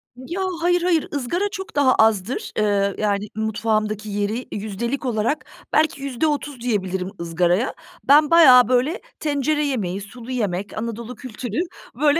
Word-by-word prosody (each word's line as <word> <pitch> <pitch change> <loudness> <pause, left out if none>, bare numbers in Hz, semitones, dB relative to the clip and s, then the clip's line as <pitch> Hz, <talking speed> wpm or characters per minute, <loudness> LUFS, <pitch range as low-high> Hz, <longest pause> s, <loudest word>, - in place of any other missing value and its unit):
Ya, 310 +9 -5 0.2
hayır, 355 0 +3
hayır, 345 -3 +1
ızgara 345 +10 -1
çok 385 -2 -7
daha 275 -3 +4
azdır. 220 +1 +1
Eee, 200 -2 +1
yani, 205 -1 -1
mutfağımdaki 215 -1 -1
yeri 205 +4 -2
yüzdelik 220 +6 -3
olarak 235 +4 -1 0.3
belki 310 -3 +2
%30 280 0 -2
diyebilirim 190 -5 -1
ızgaraya. 175 +7 +1 0.3
Ben 295 +2 +5
bayağı, 255 -8 +8
böyle, 255 +8 +1 0.2
tencere 295 0 0
yemeği, 200 -8 -2
sulu 235 +4 -10
yemek, 205 -5 -2
Anadolu 230 +2 -5
kültürü, 245 +1 -5 0.4
böyle, 295 +3 +3
240 Hz, 135 wpm, -22 LUFS, 210-285 Hz, 0.4 s, bayağı